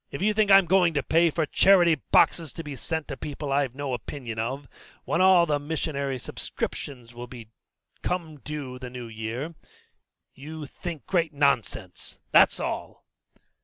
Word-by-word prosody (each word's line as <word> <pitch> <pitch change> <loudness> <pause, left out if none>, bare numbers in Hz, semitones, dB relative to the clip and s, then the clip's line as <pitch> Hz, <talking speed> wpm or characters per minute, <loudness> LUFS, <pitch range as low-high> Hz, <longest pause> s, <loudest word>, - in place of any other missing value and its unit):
If 140 - -6
you 210 +3 +2
think 210 -1 +2
I'm 195 -1 +8
going 175 -2 +3
to 140 - +1
pay 165 +1 +4
for 160 0 0
charity 175 +1 +5
boxes 160 -1 +2
to 165 - -7
be 145 -2 -6
sent 160 +3 -3
to 135 - -3
people 145 -1 -5
I've 135 -3 +1
no 140 -2 -3
opinion 120 -1 -5
of, 130 +5 -3 0.4
when 170 - +1
all 185 -2 +6
the 150 -3 0
missionary 140 -3 -2
subscriptions 125 0 -5
will 120 +1 -8
be 120 -2 -10
due 110 - -34 0.5
come 160 -5 -3
the 130 -4 -6
new 125 -1 -7
year, 115 +8 -5 0.8
you 155 +2 -8
think 165 +2 -7
great 165 -4 0
nonsense, 125 -10 -1
that's - - +6
all." - - -5
145 Hz, 165 wpm, -26 LUFS, 130-165 Hz, 0.8 s, I'm